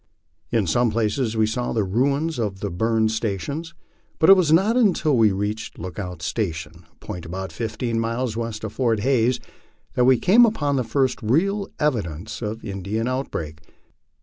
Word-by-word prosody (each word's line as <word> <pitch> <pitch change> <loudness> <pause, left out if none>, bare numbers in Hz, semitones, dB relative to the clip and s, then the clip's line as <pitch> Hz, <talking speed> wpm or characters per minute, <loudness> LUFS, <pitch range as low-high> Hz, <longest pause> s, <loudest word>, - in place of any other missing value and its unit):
In 115 -4 +2
some 120 +9 +2
places 110 +1 -1
we 110 - +4
saw 120 +3 -2
the 110 - +1
ruins 140 - 0
of 100 -4 -2
the 100 -1 -3
burned 110 +4 +1
stations, 120 - -3 0.4
but 160 +3 +6
it - - +11
was 175 -5 +2
not 195 +8 +4
until 185 - +3
we 110 -3 +4
reached 105 +3 -3
Lookout 90 -1 -6
Station, 85 -5 -4
a - - -34
point 90 - -8
about 95 +2 -5
fifteen 115 +5 -3
miles 115 +1 -2
west 115 -2 -4
of 110 -1 -5
Fort 115 -5 +1
Hays, 125 -1 +2 0.5
that 125 - +3
we 130 0 +6
came 215 - +5
upon 150 -11 +2
the 130 - +1
first 130 +3 0
real 195 - +1
evidences 105 - -2
of 110 0 -4
an - - -7
In 100 0 -5
dian 110 +5 -2
outbreak. 80 - -4
115 Hz, 175 wpm, -23 LUFS, 100-135 Hz, 0.5 s, it